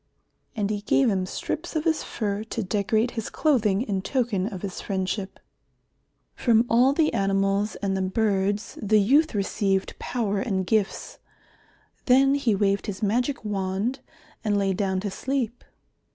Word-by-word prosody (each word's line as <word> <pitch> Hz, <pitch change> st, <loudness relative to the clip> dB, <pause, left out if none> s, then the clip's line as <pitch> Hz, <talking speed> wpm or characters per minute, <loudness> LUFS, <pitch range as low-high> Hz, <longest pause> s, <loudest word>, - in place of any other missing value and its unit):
And 210 Hz, -2 st, -1 dB
he 205 Hz, -1 st, -2 dB
gave 245 Hz, +3 st, +3 dB
him 185 Hz, -2 st, -1 dB
strips 320 Hz, -, -4 dB
of 310 Hz, -, 0 dB
his 320 Hz, -2 st, +1 dB
fur 205 Hz, -2 st, -3 dB
to 225 Hz, 0 st, -3 dB
decorate 215 Hz, +4 st, 0 dB
his 225 Hz, -3 st, -4 dB
clothing 230 Hz, -9 st, +2 dB
in 195 Hz, -6 st, -2 dB
token 220 Hz, -5 st, 0 dB
of 195 Hz, -4 st, -7 dB
his 195 Hz, -3 st, -5 dB
friendship. 190 Hz, 0 st, -3 dB, 0.9 s
From 230 Hz, -1 st, +3 dB
all 245 Hz, +4 st, +5 dB
the 305 Hz, +2 st, +2 dB
animals 195 Hz, +1 st, +1 dB
and 195 Hz, -1 st, 0 dB
the 190 Hz, -, -1 dB
birds 200 Hz, +1 st, 0 dB
the 215 Hz, +1 st, +3 dB
youth 275 Hz, +7 st, +3 dB
received 195 Hz, -1 st, 0 dB
power 210 Hz, -5 st, -1 dB
and 195 Hz, -5 st, -1 dB
gifts. 215 Hz, 0 st, -1 dB, 0.9 s
Then 270 Hz, +2 st, +5 dB
he 250 Hz, -7 st, +2 dB
waved 200 Hz, 0 st, +1 dB
his 205 Hz, 0 st, -5 dB
magic 240 Hz, +4 st, 0 dB
wand 200 Hz, +5 st, -2 dB, 0.4 s
and 210 Hz, -2 st, +1 dB
lay 195 Hz, -1 st, +1 dB
down 190 Hz, -1 st, -1 dB
to 205 Hz, -1 st, -3 dB
sleep. 250 Hz, +1 st, -3 dB
210 Hz, 150 wpm, -25 LUFS, 195-240 Hz, 0.9 s, all